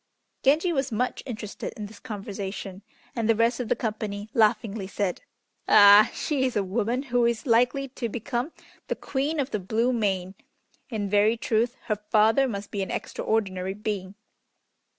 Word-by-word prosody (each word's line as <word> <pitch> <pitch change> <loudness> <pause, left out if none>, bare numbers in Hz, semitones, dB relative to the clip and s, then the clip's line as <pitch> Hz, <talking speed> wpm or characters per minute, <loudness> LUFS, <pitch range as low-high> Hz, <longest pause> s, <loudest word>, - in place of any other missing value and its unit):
Genji 315 +6 +3
was 270 -3 -1
much 250 +3 -1
interested 215 -4 -6
in 210 - -5
this 205 +1 -12
conversation, 200 -3 -6 0.3
and 230 -2 -1
the 225 - +5
rest 230 +2 +2
of 245 - -2
the - - +3
company 215 -2 -4
laughingly 215 -2 +1
said, 195 -2 -2 0.5
"Ah! 205 +1 +8
she 285 -4 -1
is 255 -2 0
a 205 - +2
woman 230 +6 -1
who 245 -3 +1
is 235 +1 0
likely 250 +3 +2
to 245 -2 -4
become 240 +5 -3 0.4
the - - -1
Queen 290 +3 -2
of 275 0 -1
the 210 - -1
Blue 225 +6 0
Main. 190 -5 -1 0.6
In 215 -5 -2
very 210 +3 +3
truth 230 +2 0
her 215 -3 -1
father 220 +5 +4
must 200 -4 -5
be 200 - -2
an 190 - -3
extraordinary 190 -3 -2
being!" 205 -2 -4
220 Hz, 165 wpm, -26 LUFS, 205-245 Hz, 0.6 s, Ah